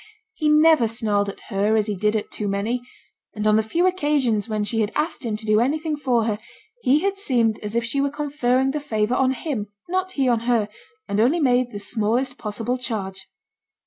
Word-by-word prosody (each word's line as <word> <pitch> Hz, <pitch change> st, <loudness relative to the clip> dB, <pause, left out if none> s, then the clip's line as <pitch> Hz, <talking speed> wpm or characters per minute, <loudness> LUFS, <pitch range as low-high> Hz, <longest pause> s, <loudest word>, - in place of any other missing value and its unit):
He 310 Hz, -7 st, 0 dB
never 305 Hz, -4 st, +5 dB
snarled 210 Hz, -3 st, 0 dB
at 200 Hz, -, -9 dB
her 205 Hz, +3 st, +1 dB
as 215 Hz, -1 st, +2 dB
he 210 Hz, -1 st, -2 dB
did 210 Hz, +3 st, +1 dB
at 215 Hz, -, -3 dB
too 210 Hz, -, -3 dB
many; 205 Hz, +5 st, -1 dB, 0.5 s
and 210 Hz, 0 st, -3 dB
on 215 Hz, 0 st, +5 dB
the 220 Hz, -, +4 dB
few 330 Hz, +12 st, 0 dB
occasions 290 Hz, -, +1 dB
when 215 Hz, -1 st, -1 dB
she 225 Hz, +2 st, -1 dB
had 210 Hz, 0 st, 0 dB
asked 310 Hz, -2 st, -1 dB
him 220 Hz, -3 st, -2 dB
to 220 Hz, -, -11 dB
do 215 Hz, 0 st, +3 dB
anything 305 Hz, +5 st, 0 dB
for 250 Hz, -5 st, +1 dB
her, 215 Hz, -2 st, -1 dB, 0.4 s
he 280 Hz, +4 st, +3 dB
had 395 Hz, 0 st, 0 dB
seemed 235 Hz, -, +1 dB
as 210 Hz, +1 st, -5 dB
if 235 Hz, -, +1 dB
she 260 Hz, +5 st, -1 dB
were 280 Hz, -, +1 dB
conferring 270 Hz, -3 st, 0 dB
the 300 Hz, -, -2 dB
favour 220 Hz, -5 st, -1 dB
on 260 Hz, 0 st, +3 dB
him, 260 Hz, -5 st, -3 dB, 0.2 s
not 375 Hz, +1 st, -1 dB
he 270 Hz, -5 st, +1 dB
on 240 Hz, -2 st, +3 dB
her, 225 Hz, -4 st, +2 dB, 0.4 s
and 200 Hz, +1 st, -1 dB
only 265 Hz, +10 st, +3 dB
made 250 Hz, -4 st, +2 dB
the 205 Hz, -, -6 dB
smallest 230 Hz, +5 st, -1 dB
possible 225 Hz, +4 st, -3 dB
charge. 195 Hz, -6 st, -4 dB
235 Hz, 210 wpm, -23 LUFS, 215-280 Hz, 0.5 s, never